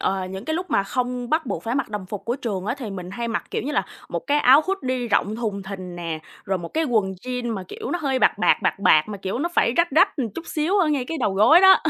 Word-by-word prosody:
ờ, 190 Hz, -1 st, -1 dB
những 190 Hz, +3 st, -7 dB
cái 315 Hz, -, -1 dB
lúc 360 Hz, +3 st, -4 dB
mà 200 Hz, -, +3 dB
không 245 Hz, +3 st, -3 dB
bắt 315 Hz, -3 st, +1 dB
buộc -, -, -3 dB
phải 230 Hz, +2 st, -2 dB
mặc 275 Hz, -4 st, -1 dB
đồng 205 Hz, -3 st, -5 dB
phục 205 Hz, 0 st, -6 dB
của 240 Hz, +2 st, -1 dB
trường 205 Hz, -7 st, -4 dB
á 230 Hz, -, 0 dB
thì 230 Hz, -6 st, -5 dB
mình 185 Hz, -2 st, -6 dB
hay 235 Hz, +3 st, -4 dB
mặc, 230 Hz, -, -2 dB
kiểu -, -, -2 dB
như 285 Hz, +5 st, -3 dB
là, -, -, +1 dB, 0.2 s
một -, -, -2 dB
cái 295 Hz, 0 st, +3 dB
áo 270 Hz, +2 st, +7 dB
hoodie 255 Hz, -11 st, -2 dB
rộng 210 Hz, 0 st, +1 dB
thùng 210 Hz, -4 st, -3 dB
thình 185 Hz, -2 st, -7 dB
nè, 165 Hz, -2 st, -4 dB, 0.3 s
rồi 190 Hz, -1 st, -1 dB
một 170 Hz, -1 st, -6 dB
cái 320 Hz, -, +2 dB
quần 215 Hz, -8 st, +1 dB
jeans 250 Hz, -2 st, -2 dB
mà 195 Hz, -, -4 dB
kiểu 440 Hz, +1 st, -6 dB
nó 350 Hz, -, -1 dB
hơi 270 Hz, -2 st, +1 dB
bạc -, -, +3 dB
bạc, -, -, +4 dB
bạc -, -, +1 dB
bạc, 160 Hz, -5 st, +5 dB
mà 205 Hz, -2 st, -6 dB
kiểu 195 Hz, +5 st, -3 dB
nó 335 Hz, -, 0 dB
phải 235 Hz, -, +3 dB
rách 340 Hz, 0 st, +3 dB
rách, 360 Hz, +7 st, +4 dB
ừm, 255 Hz, -6 st, -1 dB
chút 335 Hz, -, -7 dB
xíu 340 Hz, +6 st, 0 dB
ở 335 Hz, -, +3 dB
ngay 285 Hz, -4 st, 0 dB
cái 325 Hz, +4 st, -4 dB
đầu 205 Hz, -7 st, 0 dB
gối 295 Hz, -, +7 dB
đó 380 Hz, 0 st, +8 dB
240 Hz, 295 wpm, -23 LUFS, 195-295 Hz, 0.3 s, đó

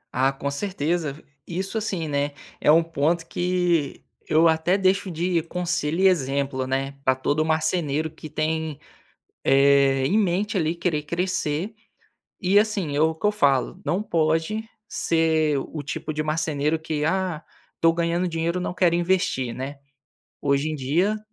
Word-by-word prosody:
Ah, 135 Hz, +1 st, +3 dB
com 140 Hz, +1 st, -4 dB
certeza 160 Hz, -3 st, -2 dB, 0.2 s
isso 190 Hz, +4 st, -4 dB
assim, 195 Hz, -7 st, -2 dB
né, 145 Hz, 0 st, -1 dB, 0.3 s
é -, -, +5 dB
um 165 Hz, +2 st, +6 dB
ponto 165 Hz, +1 st, 0 dB
que 175 Hz, -5 st, 0 dB, 0.3 s
eu 160 Hz, +2 st, +5 dB
até 160 Hz, +4 st, +2 dB
deixo 195 Hz, 0 st, +1 dB
de 170 Hz, +1 st, 0 dB
conselho 175 Hz, -1 st, -2 dB
e 195 Hz, -, +7 dB
exemplo, 135 Hz, -5 st, 0 dB
né, 135 Hz, +1 st, -1 dB
pra 130 Hz, -1 st, +3 dB
todo 145 Hz, +4 st, 0 dB
marceneiro 160 Hz, -1 st, 0 dB
que 155 Hz, 0 st, -10 dB
tem 155 Hz, 0 st, -2 dB, 0.7 s
eh 135 Hz, -1 st, +4 dB
em 195 Hz, +11 st, +2 dB
mente 200 Hz, +2 st, 0 dB
ali 160 Hz, 0 st, 0 dB
querer 170 Hz, -3 st, -1 dB
crescer, 175 Hz, +2 st, -1 dB, 0.7 s
e 190 Hz, +1 st, +2 dB
assim, 205 Hz, -8 st, 0 dB
é 145 Hz, -, +1 dB
o 160 Hz, +1 st, +3 dB
que 160 Hz, -, -1 dB
eu 210 Hz, -, +3 dB
falo, 140 Hz, -2 st, +1 dB
não 185 Hz, -, 0 dB
pode 165 Hz, +3 st, 0 dB, 0.2 s
ser 160 Hz, -6 st, +1 dB
o 150 Hz, +2 st, -5 dB
tipo 145 Hz, +2 st, -4 dB
de 155 Hz, -, -2 dB
marceneiro 155 Hz, 0 st, 0 dB
que 155 Hz, -1 st, -3 dB
"Ah, 180 Hz, -1 st, -1 dB, 0.4 s
tô 165 Hz, -, +5 dB
ganhando 170 Hz, +2 st, 0 dB
dinheiro 170 Hz, +2 st, -1 dB
e -, -, -3 dB
não 180 Hz, -, -3 dB
quero 175 Hz, -2 st, +3 dB
investir", 170 Hz, -9 st, 0 dB
né. 135 Hz, +3 st, -6 dB, 0.6 s
Hoje 140 Hz, +2 st, +1 dB
em 155 Hz, -, -3 dB
dia, 170 Hz, +11 st, +1 dB
160 Hz, 160 wpm, -24 LUFS, 145-180 Hz, 0.7 s, e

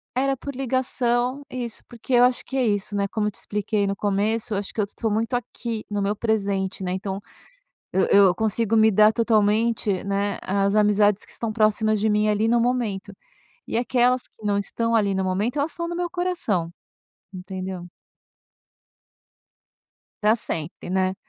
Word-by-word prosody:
Era 270 Hz, +1 st, +1 dB
por 280 Hz, +1 st, -7 dB
ligação. 255 Hz, 0 st, 0 dB
Isso, 245 Hz, -3 st, -5 dB
porque 240 Hz, +2 st, -6 dB
eu 245 Hz, 0 st, +6 dB
acho 250 Hz, 0 st, +2 dB
que 270 Hz, -, -4 dB
é 255 Hz, -, +2 dB
isso, 205 Hz, -1 st, -1 dB
né, 200 Hz, 0 st, +1 dB
como 210 Hz, +1 st, -1 dB
eu -, -, -1 dB
te -, -, -22 dB
expliquei 210 Hz, 0 st, -1 dB
no 195 Hz, -, -1 dB
começo, 210 Hz, +3 st, 0 dB
eu -, -, 0 dB
acho 200 Hz, 0 st, -4 dB
que -, -, -6 dB
eu -, -, +1 dB
estou 220 Hz, +2 st, -3 dB
muito 225 Hz, +4 st, -1 dB
aqui 235 Hz, -1 st, -4 dB
no 205 Hz, -1 st, -1 dB
meu 200 Hz, +1 st, 0 dB
presente, 200 Hz, -3 st, -1 dB
né? 180 Hz, -, -2 dB
Então, 190 Hz, +1 st, -4 dB, 0.7 s
eu 190 Hz, -, +2 dB
eu 195 Hz, -3 st, +6 dB
consigo 220 Hz, +1 st, +1 dB
me 220 Hz, 0 st, +6 dB
dar 215 Hz, +1 st, +5 dB
totalmente, 220 Hz, -2 st, +1 dB
né, 200 Hz, 0 st, -1 dB
às 200 Hz, +1 st, +1 dB
amizades 210 Hz, -1 st, +3 dB
que -, -, -17 dB
estão 230 Hz, -2 st, -3 dB
próximas 215 Hz, -1 st, +2 dB
de 220 Hz, -, +2 dB
mim 210 Hz, 0 st, +2 dB
ali 210 Hz, +1 st, +2 dB
no 235 Hz, +1 st, +3 dB
momento 230 Hz, -5 st, -1 dB, 0.5 s
e -, -, -3 dB
aquelas 250 Hz, +1 st, +2 dB
que 220 Hz, -, -19 dB
não 205 Hz, -1 st, +2 dB
estão 230 Hz, +3 st, -1 dB
ali 205 Hz, -3 st, +3 dB
no 190 Hz, 0 st, 0 dB
momento, 205 Hz, +9 st, -1 dB
elas 290 Hz, +3 st, 0 dB
estão 340 Hz, -1 st, -4 dB
no 345 Hz, -, -4 dB
meu 350 Hz, 0 st, -1 dB
coração, 335 Hz, -, -1 dB, 0.6 s
entendeu? 185 Hz, -1 st, -6 dB, 2.3 s
Pra 215 Hz, +2 st, +5 dB
sempre, 165 Hz, -7 st, -5 dB
né? 185 Hz, 0 st, +1 dB
215 Hz, 180 wpm, -24 LUFS, 200-235 Hz, 2.3 s, eu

